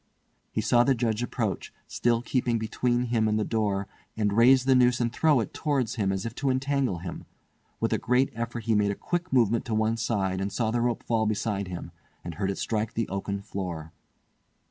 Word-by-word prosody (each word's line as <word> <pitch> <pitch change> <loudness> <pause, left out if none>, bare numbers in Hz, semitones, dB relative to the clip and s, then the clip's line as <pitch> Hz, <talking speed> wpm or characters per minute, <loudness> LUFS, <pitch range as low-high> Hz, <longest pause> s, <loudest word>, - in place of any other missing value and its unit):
He 110 - -1
saw 120 +3 +4
the 135 +1 +3
Judge 115 -2 0
approach—still 120 0 -2
keeping 125 -2 0
between 120 +2 0
him 115 -2 +1
and 105 0 +1
the - - +1
door—and 105 -1 -2
raise 125 +4 +5
the 135 - +5
noose 125 -1 +4
and 120 -1 0
throw 155 -2 +3
it 110 - -5
towards 140 -7 0
him 100 -5 0
as 95 +1 -3
if 115 - -4
to 140 - 0
entangle 130 -5 0
him. 85 +1 -7 0.5
With - - 0
a - - +1
great 125 +2 +2
effort 115 0 -4
he 115 - +1
made 105 -1 +3
a 100 - -1
quick 175 - -3
movement 115 -3 +3
to 115 - -2
one 110 +1 +1
side, 95 -5 -1
and 100 +1 -2
saw 110 +1 0
the 120 +1 0
rope 120 -1 0
fall 110 -2 +1
beside 105 -2 -1
him, 90 -2 -6 0.3
and 85 - -5
heard 95 +2 -2
it 100 - -2
strike 110 -1 -2
the 115 -2 0
oaken 100 +1 -3
floor. 90 -6 -5
115 Hz, 205 wpm, -27 LUFS, 100-120 Hz, 0.5 s, raise